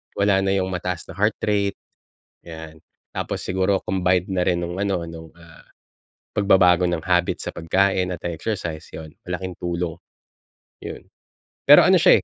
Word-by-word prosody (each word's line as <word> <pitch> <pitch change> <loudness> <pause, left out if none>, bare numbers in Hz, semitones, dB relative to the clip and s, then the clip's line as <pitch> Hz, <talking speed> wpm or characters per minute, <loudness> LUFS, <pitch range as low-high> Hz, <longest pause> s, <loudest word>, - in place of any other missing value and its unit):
Wala 100 -1 +3
na 95 0 +1
yung 95 -1 -1
mataas 90 -1 -3
na - - -9
heart 105 +3 +1
rate, 100 -2 +1 0.7
'yan. 80 -1 -9 0.3
Tapos - - -4
siguro 95 +1 0
combined 90 0 0
na 90 -2 0
rin 85 -1 +1
nung 85 +1 -4
ano, 100 -2 0
nung 80 -1 -11
ah, 85 0 -17 0.7
pagbabago 90 -3 +4
ng 85 -2 -2
habit 90 -1 +1
sa - - -4
pagkain 95 +2 +1
at - - -16
ah, 85 - -2
exercise 85 -3 -4
yon, 80 -1 -9 0.2
malaking 90 0 -5
tulong, 85 -1 -3 0.8
yon. - - -8 0.6
Pero - - +9
ano - - +5
siya - - +5
90 Hz, 155 wpm, -22 LUFS, 85-95 Hz, 0.8 s, Pero